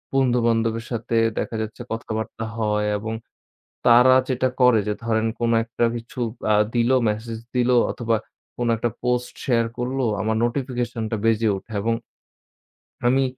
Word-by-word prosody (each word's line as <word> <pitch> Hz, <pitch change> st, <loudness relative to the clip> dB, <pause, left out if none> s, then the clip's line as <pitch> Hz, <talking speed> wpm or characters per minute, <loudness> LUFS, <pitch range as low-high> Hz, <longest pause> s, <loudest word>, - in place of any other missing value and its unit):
বন্ধু-বান্ধবের 115 Hz, -3 st, +2 dB
সাথে 115 Hz, 0 st, -1 dB, 0.2 s
দেখা -, -, -3 dB
যাচ্ছে 110 Hz, +2 st, -6 dB
কথাবার্তা 115 Hz, 0 st, -4 dB
হয়। 105 Hz, -1 st, 0 dB
এবং 110 Hz, +1 st, -4 dB, 0.7 s
তারা 125 Hz, +2 st, +7 dB
যেটা 130 Hz, 0 st, +1 dB
করে 125 Hz, -3 st, +6 dB
যে 105 Hz, -, 0 dB
ধরেন 110 Hz, -1 st, +1 dB
কোনো 115 Hz, 0 st, +2 dB
একটা 120 Hz, +1 st, -1 dB
কিছু 120 Hz, +2 st, -8 dB, 0.3 s
আ -, -, +5 dB, 0.2 s
দিল 120 Hz, +1 st, +2 dB, 0.2 s
মেসেজ 110 Hz, +2 st, -3 dB, 0.2 s
দিল 125 Hz, 0 st, +3 dB, 0.2 s
অথবা 115 Hz, -1 st, 0 dB, 0.4 s
কোনো 120 Hz, -1 st, +1 dB
একটা 115 Hz, +1 st, -1 dB
পোস্ট 125 Hz, 0 st, 0 dB
শেয়ার 115 Hz, -3 st, +2 dB
করলো, 130 Hz, +2 st, -1 dB, 0.2 s
আমার 110 Hz, +2 st, 0 dB
নোটিফিকেশন 120 Hz, -2 st, -2 dB
টা 110 Hz, -, 0 dB
বেজে 115 Hz, 0 st, +3 dB
উঠে। 110 Hz, -, -11 dB
এবং 115 Hz, +2 st, +1 dB, 1.1 s
আমি 135 Hz, +2 st, +4 dB
115 Hz, 145 wpm, -23 LUFS, 110-125 Hz, 1.1 s, তারা